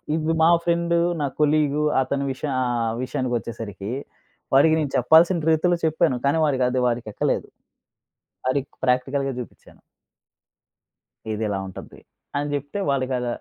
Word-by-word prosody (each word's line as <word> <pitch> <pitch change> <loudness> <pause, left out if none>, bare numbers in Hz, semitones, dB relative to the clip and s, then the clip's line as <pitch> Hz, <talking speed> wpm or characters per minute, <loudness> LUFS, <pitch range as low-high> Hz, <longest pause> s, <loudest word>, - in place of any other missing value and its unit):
ఇవ్వి 160 0 0
మా 165 - +6
ఫ్రెండు 170 0 +1 0.2
నా - - +1
కొలీగ్ 150 -1 +2 0.2
అతని 140 +1 -1
విష 130 - -9 0.2
ఆహ్, 120 -2 0
విషయానికొచ్చేసరికి 115 -5 -4 0.6
వాడికి 155 +4 +6
నేను 145 -3 -2
చెప్పాల్సిన 160 +5 +4
రీతిలో 175 +2 +2
చెప్పాను. 160 -4 +2
కానీ 140 +3 +3
వాడికది 130 -3 +1
వాడికెక్కలేదు. 115 -3 -1 1.0
ఆడికి 140 0 -1 0.2
ప్రాక్టికల్‌గా 135 +2 +1
చూపించాను. 125 - -11 1.5
ఇదిలా 105 -2 -2
ఉంటది, 95 - -11 0.4
అని 145 +1 -1
జేప్తే 145 +7 -3
వాళ్ళకద 130 -2 -1
140 Hz, 110 wpm, -23 LUFS, 125-155 Hz, 1.5 s, మా